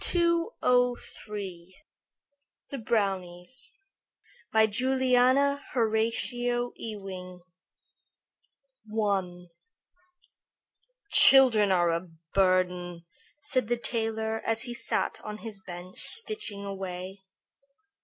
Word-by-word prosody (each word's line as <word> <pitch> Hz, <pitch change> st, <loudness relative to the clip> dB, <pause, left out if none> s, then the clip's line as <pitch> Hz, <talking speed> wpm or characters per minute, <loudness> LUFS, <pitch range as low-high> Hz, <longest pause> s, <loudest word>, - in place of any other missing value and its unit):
THE 245 Hz, -, 0 dB, 1.1 s
BROWNIES 195 Hz, 0 st, -2 dB, 0.8 s
BY 220 Hz, 0 st, +5 dB
JULIANA 260 Hz, +4 st, +2 dB
HORATIA 240 Hz, +1 st, 0 dB
EWING 185 Hz, -4 st, -8 dB, 1.6 s
I 190 Hz, -4 st, -1 dB, 1.7 s
"Children 235 Hz, -7 st, +7 dB
are 175 Hz, -2 st, +3 dB
a 170 Hz, +2 st, -2 dB, 0.3 s
burden," 180 Hz, -2 st, +1 dB, 0.4 s
said 255 Hz, -6 st, 0 dB
the 240 Hz, +1 st, 0 dB
tailor, 225 Hz, -1 st, -1 dB
as 225 Hz, 0 st, 0 dB
he 240 Hz, -, -2 dB
sat -, -, -1 dB
on 210 Hz, 0 st, -6 dB
his 215 Hz, -3 st, -8 dB
bench 180 Hz, 0 st, -9 dB
stitching 425 Hz, -, -1 dB
away. 190 Hz, 0 st, -6 dB
215 Hz, 75 wpm, -28 LUFS, 185-245 Hz, 1.7 s, Children